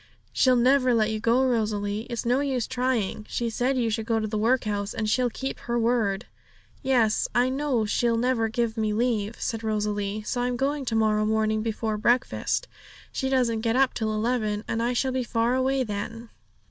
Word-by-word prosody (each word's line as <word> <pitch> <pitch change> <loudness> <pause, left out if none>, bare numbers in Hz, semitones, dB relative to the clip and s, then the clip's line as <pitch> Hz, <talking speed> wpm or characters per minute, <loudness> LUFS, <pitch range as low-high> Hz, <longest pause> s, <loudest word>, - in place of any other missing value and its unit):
'She'll 255 -1 +4
never 255 0 +4
let 220 -1 +2
you 215 - -2
go, 235 +4 +3
Rosalie; 215 -3 -1
it's 235 -1 -3
no 245 +3 +2
use 265 -4 -1
trying. 245 -5 -1
She 235 -1 -2
said 255 +4 0
you 235 -3 +1
should 220 0 -2
go 225 -1 +1
to 215 - -2
the 215 0 -4
workhouse, 215 -3 0
and 215 - -1
she'll 245 +3 +2
keep 270 +3 -5
her 240 0 -2
word!' 225 -3 +1 0.6
'Yes, 245 -5 +2
I 245 +1 +3
know 265 -4 0
she'll 230 +2 +1
never 235 -1 +1
give 230 0 -1
me 215 -1 0
leave,' 225 -2 -1
said 225 -1 -3
Rosalie; 210 -1 -2
'so 245 +3 -2
I'm 245 0 -1
going 280 +2 -1
to 230 - -1
morrow 215 -1 +2
morning 215 0 +1
before 220 -1 -2
breakfast. 245 - +1 0.4
She 265 - -2
doesn't 240 -4 +1
get 225 0 0
up 265 0 +3
till 220 -2 -1
eleven, 215 -1 -1
and 225 - -1
I 240 +2 0
shall 260 +2 0
be 255 0 -1
far 230 0 0
away 260 +1 +1
then.' 225 +2 -5
230 Hz, 195 wpm, -26 LUFS, 215-250 Hz, 0.6 s, She'll